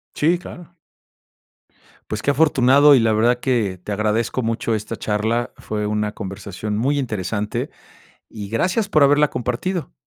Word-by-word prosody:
Sí, 170 +4 +2
claro. 175 -1 -12 1.4
Pues 105 0 -4
qué 145 - +3
afortunado 140 -1 +5
y - - +5
la 115 -1 +2
verdad 120 +3 +2
que 115 -8 0
te - - -6
agradezco 110 +4 0
mucho 115 0 -1
esta 110 +1 -3
charla, 110 +4 -1
fue 105 -1 -4
una 105 0 -1
conversación 100 +1 -6
muy 135 +7 0
interesante 105 -4 -3 0.6
y 105 -2 -7
gracias 185 - 0
por 155 -7 +3
haberla 145 +1 +4
compartido. 125 +9 -3
115 Hz, 145 wpm, -21 LUFS, 105-145 Hz, 1.4 s, afortunado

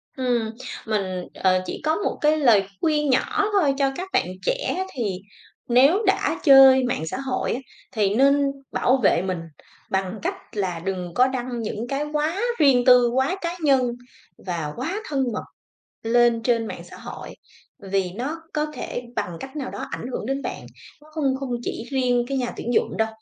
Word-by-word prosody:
Ừm, 245 -4 0 0.4
mình, 190 -4 -2
ờ, 185 -1 +2
chỉ - - -6
có 315 +1 +2
một 415 - -2
cái 305 +1 +4
lời 235 -9 +5 0.2
khuyên 300 -2 +1
nhỏ 260 +9 +2
thôi 350 -9 +3
cho 275 -1 +2
các 370 +4 -5
bạn - - +3 0.2
trẻ. - - -1
Thì 205 -8 -2 0.5
nếu 275 - +5
đã 385 - +1
chơi 270 -3 +8
mạng 245 -10 -1
xã 160 - -3
hội, 265 -1 -1
á, 245 - -3 0.3
thì 205 -3 +1
nên 275 +3 +4 0.3
bảo 255 +2 +2
vệ 175 - +4
mình, 185 -2 -2 0.5
bằng 190 +2 -1
cách - - -1 0.2
là 185 -4 -1
đừng 180 -1 -4
có 255 +6 +4
đăng 250 -2 -3
những 220 +1 -4
cái 275 +3 -1
quá 310 +6 0 0.2
riêng 265 -5 +5
tư, 250 -1 +7
quá 265 +9 +1
cá 340 0 -2
nhân 270 -4 +4 0.6
và 165 -5 -3
quá 385 - -3
thân 275 -3 +1
mật - - -3 0.6
lên 235 0 +3
trên 230 -1 +1
mạng - - -7
xã - - -12
hội, - - -9 0.6
vì 190 -2 +1
nó 290 +9 -4
có 300 0 0
thể 245 - -5
bằng 175 -2 -2
cách 270 +3 -8
nào 270 -4 -4
đó - - -6
ảnh - - -5
hưởng 215 - -4
đến 270 +2 -2
bạn. - - -5 0.4
Nó 305 - -18
không 280 -4 0
không 270 -2 -4
chỉ 230 - -4
riêng 250 -3 +1
cái 275 -1 -1
nhà 245 -2 -1
tuyển 240 - -3
dụng - - +1
đâu. 220 0 +1
255 Hz, 190 wpm, -23 LUFS, 220-285 Hz, 0.6 s, chơi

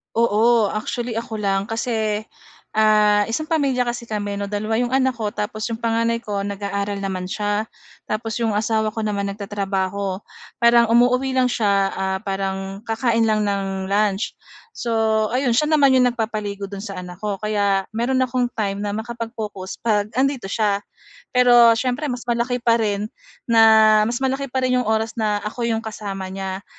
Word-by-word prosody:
Oo. 230 -1 +3
Actually, 230 +2 -3
ako 230 -1 -6
lang 195 0 0
kasi, 220 -2 -1 0.5
ah, 210 -1 +4
isang 310 +8 -3
pamilya 275 -6 +1
kasi 240 -1 -4
kami 205 -2 -3
'no, 200 - -3
dalawa 215 +2 -1
yung 245 +1 -1
anak 260 -2 +2
ko 210 -2 -3
tapos 215 +1 -3
yung 230 0 -5
panganay 230 0 0
ko, 205 -2 -3
nag-aaral 200 0 -3
naman 185 -1 -3
siya. 205 +2 -1 0.4
Tapos 225 +2 -3
yung 225 -3 0
asawa 220 0 +1
ko 220 - -3
naman, 200 -1 -1
nagtatrabaho. 195 -1 -3 0.4
Parang 235 0 +6
umuuwi 250 +3 +3
lang 255 -1 +3
siya, 200 -4 +2
ah, 190 0 -2
parang 195 0 -3
kakain 230 0 +1
lang 215 -1 +2
ng 195 -1 -2
lunch. 205 +1 +1 0.5
So 235 -1 -2 0.4
ayun, 250 -2 +1
siya 305 +3 +2
naman 285 -3 +5
yung 250 - +5
nagpapaligo 210 -3 -3
do'n 200 +1 -7
sa 195 -4 -6
anak 180 0 -9
ko, 205 -1 -4
kaya 200 -2 0
meron 245 +4 0
akong 255 0 +1
time 200 -3 -2
na 205 0 -3
makapag-focus 220 -4 -6
'pag 210 -3 +1
andito 265 -2 0
siya. 205 0 0 0.4
Pero 240 -2 +6
siyempre, 255 +5 -1
mas 245 -1 -4
malaki 240 +1 0
pa 235 -1 +2
rin 205 -1 0 0.4
na 220 -2 +6
mas 240 - -2
malaki 270 +1 -1
pa 260 0 -1
rin 255 0 +2
yung 230 - -3
oras 220 0 0
na 210 -3 -1
ako 235 +2 -3
yung 225 0 -1
kasama 195 -3 -5
niya, 190 0 -5
220 Hz, 170 wpm, -21 LUFS, 200-235 Hz, 0.5 s, Parang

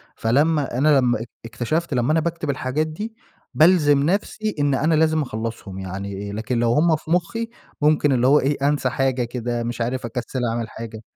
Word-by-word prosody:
فلمّا 140 +2 +1
أنا 145 +1 +4
لمّا 120 -3 +1
اك 115 - -8 0.2
إكتشفت 155 +8 -2
لمّا 125 +4 +1
أنا 160 - +3
باكتب 165 -2 -3
الحاجات 140 +3 -1
دي 215 +8 -6 0.4
بالزم 150 -4 +5
نفسي 210 +4 -1
إن 145 -1 +2
أنا 155 +4 +1
لازم 155 0 +3
أخلصهم، 110 -5 -5
يعني 100 +2 -5
لكن 115 +3 -2
لو 120 0 +2
هُم 160 +2 +4
في 155 +1 -8
مخي 225 +7 0 0.3
ممكن 150 -1 +3
اللي 125 0 +3
هو 145 +2 +6
إيه، 140 +2 0
أنسى 145 -3 +1
حاجة 130 -1 0
كده، 120 0 -3
مش 120 0 -4
عارف 125 +1 -2
أكَسِّل 125 +1 -3
أعمل 115 -2 -3
حاجة. 110 -1 -8
135 Hz, 185 wpm, -22 LUFS, 120-155 Hz, 0.4 s, هو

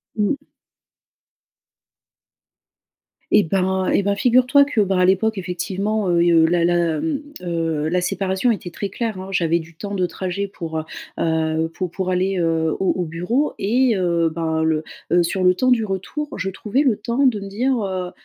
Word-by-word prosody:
Mmh. 215 +6 +1 2.9
Et 205 - +6
ben 190 +2 0
et - - +2
ben 200 +1 +1
figure-toi 250 +5 +4
que, 280 -5 -2
ben, 195 -1 +1
à 180 - +4
l'époque 195 +3 +2
effectivement, 190 +3 -2
heu 170 -1 +3
et 175 0 +4
heu, 165 -1 +5
la 170 +1 +2
la, 170 -2 +1
mmh, 295 -3 -2 0.2
heu, 165 -3 -1
la 180 +2 +1
séparation 190 +4 0
était 195 -5 -4
très 200 +4 -4
claire, 220 -1 -3
hein. 190 +1 -7
J'avais 170 -2 +1
du 165 0 -12
temps 200 +4 -5
de 185 -2 +1
trajet 185 +3 -3
pour, 165 -5 -6
heu, - - -4 0.4
heu, 160 0 0
pou 185 +1 -3
pour 185 +2 -3
aller, 185 +1 0
heu, 165 -1 +1
au 190 - +2
au 180 - -1
bureau 180 - -1
et 235 +2 +2
heu, 170 -2 +1
ben, 160 -1 -1
le 160 -1 +1 0.3
heu, 175 0 +4
sur 185 +2 -1
le 180 0 +5
temps 255 +6 +2
du 235 -3 +3
retour, 205 +10 -4
je 190 +1 -1
trouvais 215 +8 -1
le 255 -7 +3
temps 235 +6 0
de 225 -5 +1
me 195 - -7
dire, 250 +7 0
heu, 185 -2 -3
185 Hz, 185 wpm, -21 LUFS, 170-210 Hz, 2.9 s, Et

